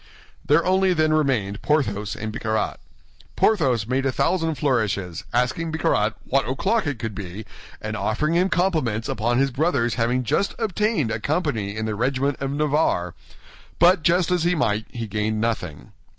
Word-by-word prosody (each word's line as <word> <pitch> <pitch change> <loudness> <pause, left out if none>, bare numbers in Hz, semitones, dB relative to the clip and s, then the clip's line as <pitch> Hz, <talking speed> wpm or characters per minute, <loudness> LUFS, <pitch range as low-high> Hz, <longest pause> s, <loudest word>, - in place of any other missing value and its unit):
There 150 +3 +3
only 190 0 +3
then 155 -1 +2
remained 125 -10 0
Porthos 105 -9 0
and 110 0 -5
Bicarat. 110 -1 -2 0.6
Porthos 130 - +2
made 130 +3 0
a 135 - +1
thousand 165 +2 0
flourishes, 105 - -1
asking 130 +7 0
Bicarat 110 -9 +1
what 135 0 +1
o'clock 195 - 0
it 145 -4 -2
could 110 -2 -4
be, 100 +2 -7 0.3
and 110 0 -4
offering 110 +10 0
him 180 +2 +3
his - - -1
compliments 155 - 0
upon 120 +2 0
his 135 +1 +2
brother's 130 -4 +1
having 125 +2 +1
just 195 - 0
obtained 210 - 0
a 110 - -2
company 120 - -1
in 110 - -2
the 110 - -2
regiment 130 +5 0
of 135 - -2
Navarre; 145 - 0 0.6
but, 175 +1 +5
jest 175 +3 +2
as 180 -2 +2
he 175 +1 +2
might, 110 -8 0
he 115 -2 -5
gained 105 +1 -2
nothing. 105 -10 -3
130 Hz, 165 wpm, -23 LUFS, 110-160 Hz, 0.6 s, but